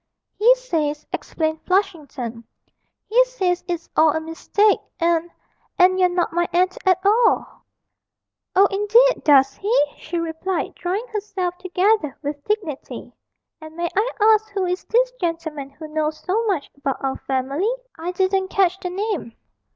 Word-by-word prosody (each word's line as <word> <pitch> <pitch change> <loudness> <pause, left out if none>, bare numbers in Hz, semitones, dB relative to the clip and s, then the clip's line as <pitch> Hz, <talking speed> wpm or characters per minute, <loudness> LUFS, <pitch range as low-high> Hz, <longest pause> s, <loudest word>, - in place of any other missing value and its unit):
'He 480 +4 +6
says,' 310 -12 -2
explained 315 -1 -2
Flushington, 295 - -2 0.6
'he 485 +3 +4
says 375 -8 -1
it's 345 -2 -4
all 315 -1 +5
a - - 0
mistake, 330 +6 +1 0.2
and 335 0 +1 0.5
and 370 0 +5
you're 365 -1 +4
not 355 -1 -1
my 345 0 +1
aunt 365 +1 +2
at 370 -2 +5
all!' 450 +3 +4 1.1
'Oh, 390 +2 +7
indeed, 445 +5 +3
does 275 -3 +5
he?' 410 -6 +2
she 345 +2 -5
replied, 335 +2 -3
drawing 380 +6 -3
herself 400 -4 -3
together 370 -3 +1
with 290 0 -4
dignity; 405 -10 -4 0.5
'and 315 0 -11
may 345 0 -2
I 435 +5 +2
ask 435 0 +4
who 395 -2 -2
is 360 +1 -2
this - - +2
gentleman 320 -5 -3
who 305 +3 -10
knows 310 0 -2
so 410 +5 0
much 360 -9 -1
about 275 -1 -2
our 270 -1 -1
family 275 - 0 0.2
I 335 +2 -4
didn't 380 +1 +1
catch 375 -1 +1
the 360 - -4
name?' 380 - -3
360 Hz, 150 wpm, -22 LUFS, 315-405 Hz, 1.1 s, Oh